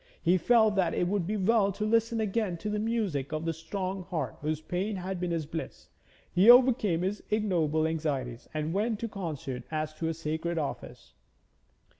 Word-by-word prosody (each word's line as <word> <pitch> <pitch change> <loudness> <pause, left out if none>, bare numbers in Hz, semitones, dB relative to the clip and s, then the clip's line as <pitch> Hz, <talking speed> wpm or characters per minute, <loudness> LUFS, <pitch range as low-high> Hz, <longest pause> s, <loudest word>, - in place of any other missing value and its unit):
He 175 +2 +3
felt 220 0 +4
that 185 -3 +2
it 175 - +1
would 190 -2 0
be 215 +1 -1
well 200 0 +3
to 210 - -3
listen 230 +1 +2
again 210 -4 -1
to 210 +5 -4
the 210 - -1
music 210 - -1
of 155 +1 -3
that 165 - 0
strong 185 +3 -4
heart 155 -7 -3
whose 155 +1 -1
pain 180 +6 -2
had 185 0 -4
been 180 0 -2
his 165 -2 -1
bliss. 160 +2 -7 0.4
He 190 +6 +5
overcame 240 -9 +6
his 195 +3 -2
ignoble 170 -8 +1
anxieties 140 -7 -3
and 155 +1 -2
went 215 +3 0
to 230 - -1
the 215 - -15
concert 150 - -4
as 155 -1 -2
to 160 +1 -3
a 165 - -1
sacred 165 +2 -3
office. 150 -3 -5
180 Hz, 190 wpm, -29 LUFS, 155-210 Hz, 0.4 s, overcame